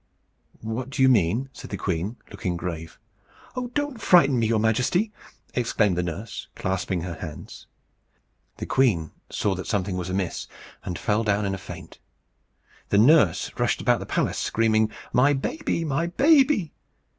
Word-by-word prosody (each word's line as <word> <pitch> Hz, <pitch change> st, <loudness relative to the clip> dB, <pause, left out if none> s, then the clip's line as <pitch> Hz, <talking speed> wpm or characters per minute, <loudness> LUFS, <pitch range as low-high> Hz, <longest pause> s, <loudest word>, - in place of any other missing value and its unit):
"What 115 Hz, +4 st, -4 dB
do 135 Hz, -1 st, 0 dB
you 130 Hz, -, +7 dB
mean?" 115 Hz, +3 st, +2 dB
said -, -, -10 dB
the 100 Hz, -, -4 dB
queen, 95 Hz, +4 st, -2 dB, 0.2 s
looking 90 Hz, -1 st, -3 dB
grave. 85 Hz, -2 st, -6 dB, 0.6 s
"Oh! 250 Hz, -1 st, -2 dB
don't 290 Hz, -5 st, -2 dB
frighten 140 Hz, -10 st, +5 dB
me, 115 Hz, -, +2 dB
your 115 Hz, 0 st, +2 dB
Majesty!" 125 Hz, -, +1 dB, 0.4 s
exclaimed 110 Hz, -5 st, +1 dB
the 90 Hz, -, 0 dB
nurse, 90 Hz, +6 st, -5 dB
clasping 95 Hz, -1 st, -2 dB
her 85 Hz, 0 st, -4 dB
hands. 80 Hz, -2 st, -9 dB, 0.9 s
The -, -, -5 dB
queen 105 Hz, -, +2 dB, 0.2 s
saw 105 Hz, -, 0 dB
that 95 Hz, 0 st, -6 dB
something 95 Hz, -3 st, -1 dB
was 90 Hz, 0 st, -4 dB
amiss, 95 Hz, -1 st, -2 dB, 0.4 s
and 90 Hz, -, -4 dB
fell 105 Hz, +2 st, 0 dB
down 105 Hz, -1 st, +1 dB
in 95 Hz, -, -1 dB
a 95 Hz, -, -4 dB
faint. 90 Hz, -3 st, -10 dB, 0.9 s
The 100 Hz, -, +3 dB
nurse 115 Hz, -, +5 dB
rushed -, -, +1 dB
about -, -, +2 dB
the -, -, -7 dB
palace, -, -, 0 dB
screaming, 110 Hz, -1 st, +2 dB, 0.2 s
"My 135 Hz, +4 st, +5 dB
baby! 165 Hz, -, -2 dB
my 155 Hz, +3 st, 0 dB
baby!" 270 Hz, -, +3 dB
110 Hz, 155 wpm, -25 LUFS, 90-135 Hz, 0.9 s, you